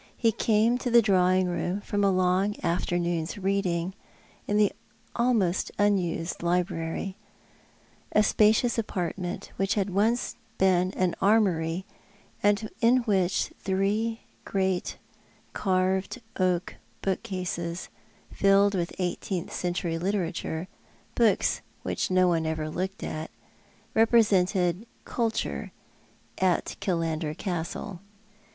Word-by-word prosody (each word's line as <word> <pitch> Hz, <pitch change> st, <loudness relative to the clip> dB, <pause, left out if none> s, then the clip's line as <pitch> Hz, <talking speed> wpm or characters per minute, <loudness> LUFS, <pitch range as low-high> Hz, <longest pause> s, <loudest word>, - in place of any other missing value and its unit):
He 230 Hz, -2 st, +3 dB
came 225 Hz, +3 st, +2 dB
to 250 Hz, -, -2 dB
the 235 Hz, -1 st, +6 dB
drawing 185 Hz, -2 st, +3 dB
room 175 Hz, +2 st, -1 dB
from 205 Hz, 0 st, -1 dB
a 200 Hz, -, +5 dB
long 185 Hz, +2 st, +2 dB
afternoon's 175 Hz, +1 st, -1 dB
reading 190 Hz, -2 st, 0 dB, 0.5 s
in 205 Hz, -, +1 dB
the 210 Hz, -1 st, +4 dB, 0.4 s
almost 225 Hz, -7 st, +1 dB
unused 185 Hz, -5 st, 0 dB
library— 175 Hz, +2 st, -1 dB, 0.9 s
a 215 Hz, -, +4 dB
spacious 220 Hz, +3 st, +3 dB
i -, -, +4 dB
apartment, 180 Hz, -3 st, -4 dB
which 195 Hz, +1 st, +1 dB
had 200 Hz, -2 st, 0 dB
once 220 Hz, +6 st, +1 dB, 0.2 s
been 185 Hz, -1 st, +3 dB
an 185 Hz, -2 st, +1 dB
armoury, 190 Hz, -4 st, +2 dB, 0.6 s
and 205 Hz, +1 st, +2 dB
in 245 Hz, +2 st, +4 dB
which 190 Hz, -5 st, +1 dB
three 205 Hz, +4 st, 0 dB, 0.2 s
great 190 Hz, -2 st, -1 dB, 0.6 s
carved 190 Hz, +3 st, 0 dB, 0.2 s
oak 180 Hz, -2 st, 0 dB, 0.3 s
bookcases, 185 Hz, -3 st, -3 dB, 0.5 s
iilled 200 Hz, +1 st, +5 dB
with 175 Hz, -2 st, -2 dB
eighteenth 180 Hz, 0 st, -3 dB
century 175 Hz, -2 st, -2 dB
literature 175 Hz, -2 st, -2 dB, 0.2 s
— -, -, -33 dB
books 220 Hz, -5 st, +2 dB, 0.2 s
which -, -, -1 dB
nobody 180 Hz, -3 st, +3 dB
ever 155 Hz, -1 st, -3 dB
looked 190 Hz, +4 st, -4 dB
at— 155 Hz, +1 st, -4 dB, 0.6 s
represented 200 Hz, -4 st, +3 dB, 0.2 s
culture 230 Hz, -2 st, -2 dB, 0.7 s
at 185 Hz, -2 st, +1 dB
Killander 165 Hz, -4 st, -1 dB
Castle. 175 Hz, +1 st, -4 dB
190 Hz, 105 wpm, -27 LUFS, 175-205 Hz, 0.9 s, the